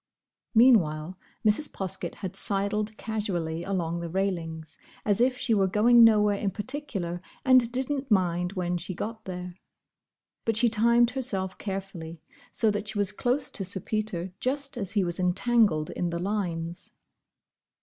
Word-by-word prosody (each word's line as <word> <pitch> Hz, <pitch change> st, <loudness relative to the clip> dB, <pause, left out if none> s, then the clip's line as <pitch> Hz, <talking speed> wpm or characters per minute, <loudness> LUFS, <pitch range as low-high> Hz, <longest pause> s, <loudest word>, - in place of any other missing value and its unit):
Meanwhile 185 Hz, -9 st, +4 dB, 0.3 s
Mrs. 215 Hz, +8 st, +2 dB
Poskett 185 Hz, -2 st, -4 dB
had 190 Hz, +1 st, -5 dB
sidled 205 Hz, +2 st, 0 dB
casually 175 Hz, -7 st, -3 dB
along 170 Hz, -3 st, -2 dB
the 170 Hz, 0 st, -5 dB
railings, 165 Hz, -4 st, -3 dB, 0.3 s
as 205 Hz, +1 st, +2 dB
if 250 Hz, +1 st, +3 dB
she 235 Hz, -, 0 dB
were 195 Hz, -3 st, +3 dB
going 230 Hz, +5 st, +6 dB
nowhere 210 Hz, -2 st, +5 dB
in 205 Hz, -, 0 dB
particular 200 Hz, -, -4 dB, 0.2 s
and 255 Hz, -3 st, +5 dB
didn't 265 Hz, +2 st, -2 dB
mind 180 Hz, -3 st, +1 dB
when 180 Hz, -2 st, -1 dB
she 185 Hz, +2 st, -5 dB
got 220 Hz, +4 st, -5 dB
there. 180 Hz, -1 st, -7 dB, 0.8 s
But 225 Hz, -2 st, 0 dB
she 235 Hz, +1 st, +4 dB
timed 235 Hz, +2 st, +4 dB
herself 195 Hz, -8 st, -2 dB
carefully, 190 Hz, -5 st, -6 dB, 0.3 s
so 220 Hz, -2 st, +2 dB
that 205 Hz, 0 st, -3 dB
she 215 Hz, 0 st, -3 dB
was 205 Hz, -1 st, +1 dB
close 250 Hz, +6 st, 0 dB
to 195 Hz, -, -3 dB
Sir 190 Hz, 0 st, -2 dB
Peter 190 Hz, -4 st, -3 dB
just 275 Hz, +1 st, -1 dB
as 195 Hz, -6 st, -2 dB
he 205 Hz, -3 st, +2 dB
was 175 Hz, 0 st, -3 dB
entangled 185 Hz, -3 st, +2 dB
in 175 Hz, -, -2 dB
the 170 Hz, -, -3 dB
lines. 175 Hz, -3 st, -3 dB
200 Hz, 150 wpm, -27 LUFS, 175-225 Hz, 0.8 s, going